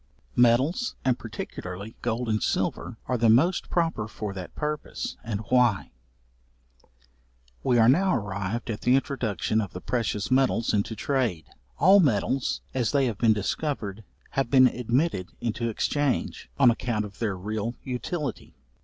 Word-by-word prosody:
Metals, 130 - +3
and 125 -2 +2
particularly 105 -2 -7
gold 120 +2 -1
and 110 -1 0
silver, - - -1
are 125 -2 -1
the 115 0 +4
most 155 +12 +3
proper 165 -11 0
for 105 -2 -5
that 95 -2 -8
purpose, 150 0 -4
and 110 -2 -3
why. 125 -6 +3 1.7
We 125 - +3
are 115 -1 +6
now 185 +9 +4
arrived 100 +1 -3
at 105 - -5
the 125 +1 +4
introduction 115 - 0
of 100 - -6
the 90 - -5
precious 105 -1 -2
metals 130 -3 +2
into 105 +2 0
trade. 110 - -1 0.3
All 190 +7 +7
metals, 130 - +1
as 125 -1 0
they 140 -2 +3
have 115 -4 -2
been 115 -2 +5
discovered, 105 -1 -3 0.3
have 135 -3 0
been 130 -1 +7
admitted 125 - 0
into 115 0 -2
exchange, 145 +4 -1
on 130 -4 +6
account 115 -2 -2
of 100 -2 -12
their 105 -5 -1
real 110 +4 -3
utility. 130 - -4
120 Hz, 145 wpm, -26 LUFS, 105-135 Hz, 1.7 s, All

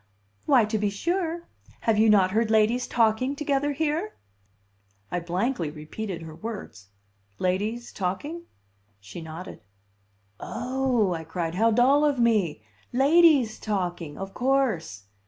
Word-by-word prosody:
"Why, 250 -6 +5
to 215 0 -2
be 205 0 +1
sure! 340 - -2 0.3
Have 220 -2 +2
you 220 0 +5
not 195 -3 +5
heard 220 +2 +1
ladies 220 +3 +2
talking 235 +4 +1
together 285 0 0
here?" 320 +7 -2 1.0
I 180 - 0
blankly 175 - -1
repealed 165 +4 -6
her 160 -1 -9
words. 165 - -8 0.5
"Ladies 210 - -2
talking?" 285 - -4 0.5
She 100 - -10
nodded. 160 0 -9 0.8
"Oh!" 250 -5 0
I 165 -1 -4
cried. 165 0 -3
"How 225 +6 +3
dull 255 +6 +4
of 290 -2 +2
me! 210 - +1 0.3
Ladies 280 -3 +4
talking! 175 -7 -3
Of 195 0 -6
course!" 245 - 0
220 Hz, 125 wpm, -26 LUFS, 180-265 Hz, 1.0 s, Why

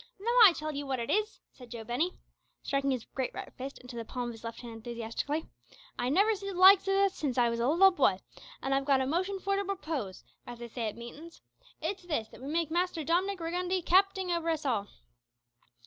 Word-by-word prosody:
"Now, 455 +4 -1
I 375 - +8
tell 310 -2 -5
'ee 285 - -2
what 270 -2 -2
it 230 - -2
is, - - +4
lads," 430 0 -7
said 250 -2 -14
Joe 230 -1 -7
Binney, 255 +11 -1 0.5
striking 275 0 0
his 255 -4 -1
great 260 -2 -2
right - - -7
fist 270 +2 -7
into 250 -1 -11
the 230 - -4
palm 245 +1 -4
of - - -6
his 225 - -13
left 230 0 -6
hand 235 -2 -8
enthusiastically, 235 +6 -4 0.5
"I 245 +1 0
never 400 +10 +4
seed 395 -1 -5
the - - -4
likes 385 +1 +8
o' 390 - +2
that 395 0 +4
since 275 -8 -3
I 240 -1 +4
was 235 - -2
a 235 - +1
leetle 365 +6 +6
booy, 260 - +2 0.4
and 270 - 0
I've 270 0 +1
got 270 -2 +3
a - - 0
motion 370 +8 -1
for 395 +1 -1
to 400 - 0
propose, 315 - -4 0.2
as 240 - -7
they 235 0 -8
say 230 -1 -3
at 215 - -5
meetin's. 285 +8 -11 0.4
It's 395 - -2
this, 300 -11 -3
that - - -14
we 270 - -7
makes 330 -1 0
Master 350 -1 0
Dom'nik 365 +5 0
Riggundy 355 +2 -1
capting 380 0 +3
over 335 -1 -2
us 315 -2 -1
all." 220 -7 0
295 Hz, 235 wpm, -30 LUFS, 245-370 Hz, 0.5 s, I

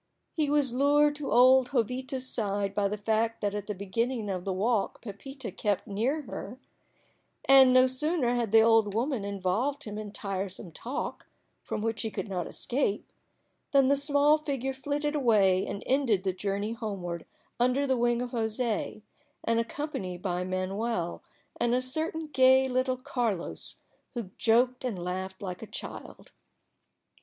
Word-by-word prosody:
He 305 -3 0
was 285 -4 +3
lured 290 +3 +4
to 295 -2 -4
old 255 +1 +6
Jovita's 255 +2 -1
side 200 -4 -1
by 200 0 +1
the 210 +1 -3
fact 225 +2 0
that 205 -1 0
at 205 -1 -4
the 210 - -3
beginning 210 +3 -2
of 180 -2 -4
the 195 - -1
walk 205 +3 0
Pepita 265 +6 -7
kept 205 -4 -1
near 245 +10 -1
her, 250 -1 -7 0.9
and 270 -1 +8
no 255 0 +7
sooner 260 0 +1
had 235 -4 -1
the 225 0 +7
old 220 -2 +4
woman 245 -1 0
involved 200 +8 -1
him 210 -1 -5
in 210 -1 -6
tiresome 195 -3 -4
talk, 250 - -5 0.3
from 210 - -4
which 225 0 -1
he 225 - -2
could 215 - -5
not 180 -3 -2
escape, 240 -5 -2 0.6
than 275 -1 +5
the 280 - +5
small 285 +2 +3
figure 270 -3 -2
flitted 290 +3 -2
away 205 -9 +3
and 200 - -5
ended 250 -8 +2
the 190 -1 0
journey 200 +3 -2
homeward 195 -7 -5 0.3
under 255 +3 +2
the 265 -1 +2
wing 240 0 +1
of 245 - -6
José, 220 -2 -1 0.4
and 230 0 +1
accompanied 230 - -4
by 180 -2 -1
Manuel 185 0 -2 0.4
and 240 +1 +2
a - - +3
certain 315 +5 -2
gay 260 -2 +5
little 255 0 0
Carlos, 235 -7 -2 0.4
who 225 -6 -5
joked 245 +3 +3
and 240 -6 -2
laughed 185 +2 -5
like 180 -2 -5
a 220 - -7
child. - - -8
230 Hz, 160 wpm, -29 LUFS, 200-265 Hz, 0.9 s, and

